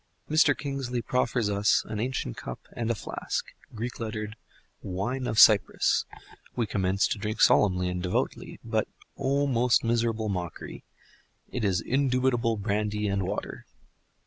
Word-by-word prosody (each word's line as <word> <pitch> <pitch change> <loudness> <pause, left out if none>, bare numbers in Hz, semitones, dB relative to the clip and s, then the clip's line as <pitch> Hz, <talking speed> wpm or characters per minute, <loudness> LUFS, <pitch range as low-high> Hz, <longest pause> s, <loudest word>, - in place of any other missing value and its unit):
Mr. 155 +1 +4
Kingsley 135 -3 -3
proffers 125 -3 0
us 100 0 +2
an 110 -1 -4
ancient 125 - -2
cup - - -7
and 115 -1 -3
a 115 - +1
flask, - - -4 0.3
Greek 120 +2 -5
lettered 110 -1 -4 0.5
"Wine 120 +8 -3
of 110 - -2
Cyprus"; 105 -4 +5 0.5
we 120 - +1
commence 95 -1 +1
to - - -2
drink 105 +1 -3
solemnly 90 -3 +4
and 90 0 -2
devoutly, 90 0 -2
but—O 140 +2 -2
most 125 -2 +3
miserable 115 -1 0
mockery! 90 -4 -5 0.7
it 125 - -3
is 95 -3 +1
indubitable 125 -3 +1
brandy 105 0 -1
and 100 -2 -1
water. 100 - -5
110 Hz, 135 wpm, -27 LUFS, 100-125 Hz, 0.7 s, Cyprus